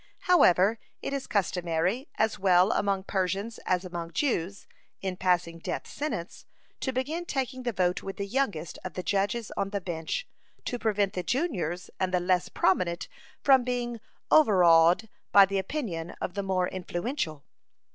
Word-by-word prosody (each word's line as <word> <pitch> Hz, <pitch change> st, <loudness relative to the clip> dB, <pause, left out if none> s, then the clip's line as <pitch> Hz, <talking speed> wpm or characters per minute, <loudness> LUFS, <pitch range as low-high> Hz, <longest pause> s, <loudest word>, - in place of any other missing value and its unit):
However, 220 Hz, -, +4 dB, 0.2 s
it -, -, -3 dB
is 275 Hz, -1 st, -3 dB
customary, 180 Hz, -, 0 dB
as 220 Hz, -1 st, 0 dB
well 185 Hz, 0 st, +5 dB
among 195 Hz, -2 st, 0 dB
Persians 195 Hz, +4 st, -2 dB
as 185 Hz, 0 st, +1 dB
among 170 Hz, -2 st, -6 dB
Jews, 195 Hz, -, -1 dB, 0.3 s
in 190 Hz, -1 st, -3 dB
passing 180 Hz, -2 st, 0 dB
death -, -, -4 dB
sentence, 225 Hz, -, -5 dB, 0.3 s
to 265 Hz, -, -1 dB
begin 280 Hz, +7 st, -2 dB
taking 265 Hz, -5 st, -3 dB
the 245 Hz, -1 st, -1 dB
vote 180 Hz, -3 st, 0 dB
with 195 Hz, -, -6 dB
the 200 Hz, -, -2 dB
youngest 200 Hz, -, -2 dB
of 185 Hz, -, -6 dB
the 185 Hz, -, -3 dB
judges 205 Hz, +4 st, -1 dB
on 195 Hz, -, -1 dB
the 200 Hz, 0 st, -2 dB
bench, 175 Hz, -, -4 dB, 0.4 s
to 245 Hz, -, -3 dB
prevent 210 Hz, -3 st, +1 dB
the 180 Hz, -, -2 dB
juniors 180 Hz, -, -2 dB
and 185 Hz, -1 st, 0 dB
the 180 Hz, -, +2 dB
less 180 Hz, 0 st, +1 dB
prominent 170 Hz, -3 st, +1 dB, 0.4 s
from 265 Hz, -3 st, +6 dB
being 240 Hz, -1 st, -2 dB, 0.3 s
overawed 180 Hz, -, +6 dB, 0.2 s
by 200 Hz, -1 st, +9 dB
the 195 Hz, 0 st, -1 dB
opinion 190 Hz, -, -4 dB
of 180 Hz, -, -3 dB
the 200 Hz, -, -2 dB
more 185 Hz, -2 st, 0 dB
influential. 175 Hz, -, -3 dB
195 Hz, 155 wpm, -28 LUFS, 180-235 Hz, 0.4 s, by